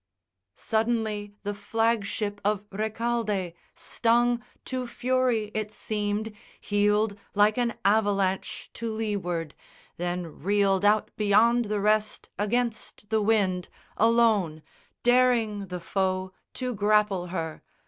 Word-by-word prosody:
Suddenly 220 -2 -1
the 205 0 -2
flag 225 +1 0
ship 205 0 -3
of 205 0 0
Recaldé, 215 -3 -1 0.2
stung 240 +1 +2 0.2
To 255 -1 -3
fury 245 -3 0
it 215 -1 -3
seemed, 210 0 -2 0.3
heeled 210 +1 +1 0.2
like 210 +1 +4
an 235 -2 0
avalanche 200 -2 +1
To 230 -1 -4
leeward, 190 -8 -2 0.4
then 175 -2 -4
reeled 200 +1 +2
out 210 +1 +3
beyond 225 +3 +4
the 210 0 -1
rest 215 +1 +1
Against 220 -1 -2
the 220 -1 +2
wind, 200 -4 +1 0.3
alone, 215 -9 +3 0.4
daring 240 -5 +3
the 180 0 -5
foe 185 +1 -1 0.2
To 250 -1 -3
grapple 205 -3 +2
her. 165 -3 -4
210 Hz, 110 wpm, -27 LUFS, 200-225 Hz, 0.4 s, like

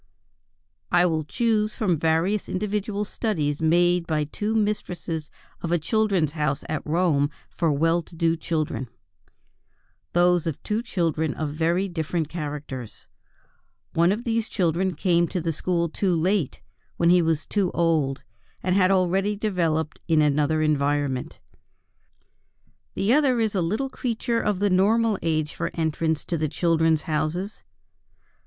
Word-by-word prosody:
I 175 0 +5
will 160 -3 0
choose 215 +5 0
from 180 -8 0
various 165 +6 +1
individual 210 +1 -2
studies 155 -10 -2
made 175 +1 +3
by 155 -2 +1
two 210 +9 -3
mistresses 175 -7 -2 0.3
of 170 - -3
a 175 - +4
Children's 190 -2 +1
House 150 -2 -1
at 155 -1 -2
Rome 155 -3 +2 0.2
for 165 -2 0
well 165 +4 +2
to 170 - -15
do 165 0 +2
children, 155 -5 -2 1.3
those 175 -1 +3
of 160 - -3
two 215 +2 -1
children 165 - -1
of 155 -2 -2
very 170 +5 +1
different 165 -2 -2
characters. 145 -7 -6 0.9
One 170 +2 +4
of 215 +4 -2
these 230 -2 -1
children 180 -1 0
came 170 +1 +2
to 180 - -3
the 165 -1 -1
school 170 +2 0
too 180 +2 0
late, 180 -2 0 0.3
when 170 0 +4
he 180 0 +5
was 160 -2 0
too 200 -4 0
old, 155 -5 +1 0.4
and 185 0 +1
had 185 -2 +4
already 195 +2 +2
developed 170 -7 -1
in 160 -3 +3
another 150 +1 +2
environment. 145 -3 0 1.6
The 205 +5 +2
other 270 -4 +3
is 220 -2 +1
a 190 - +1
little 215 +11 -1
creature 235 -1 -1
of 210 -2 0
the 200 +1 +1
normal 210 +3 +3
age 155 -2 -1
for - - -3
entrance 160 -1 -1
to 170 - -2
the 155 -1 0
Children's 165 -1 +2
Houses. 165 +6 -2
170 Hz, 145 wpm, -24 LUFS, 155-195 Hz, 1.6 s, I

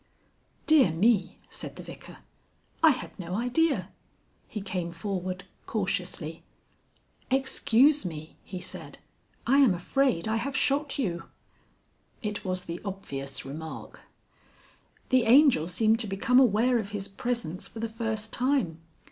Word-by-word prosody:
"Dear 310 - +6
me!" 195 +3 +2
said - - -6
the - - -8
Vicar. - - -11 0.6
"I 320 - +8
had 260 - -1
no 180 0 -4
idea." 250 +8 +1 0.6
He 215 - -5
came 185 -3 -3
forward 185 +1 -4 0.2
cautiously. 180 -6 -2 0.9
"Excuse 265 +2 +4
me," 160 -3 -6
he 185 - -6
said, 180 - -8 0.5
"I 270 +3 +4
am 250 -10 +6
afraid 220 +1 +1
I 220 +1 +1
have 260 +4 -2
shot 280 +1 +1
you." 170 -10 -2 1.0
It 210 -1 -3
was 185 -1 -3
the 170 +1 -5
obvious 140 -9 -5
remark. 155 +4 -7 1.1
The 255 -2 +4
Angel 250 - +6
seemed 220 +5 +2
to 225 - -3
become 210 +6 +3
aware 240 0 +4
of 200 -3 -4
his 200 -2 -4
presence 200 -4 -3
for 225 - -10
the 230 - -1
first 220 -1 -3
time. 245 - +1
210 Hz, 130 wpm, -28 LUFS, 180-250 Hz, 1.1 s, I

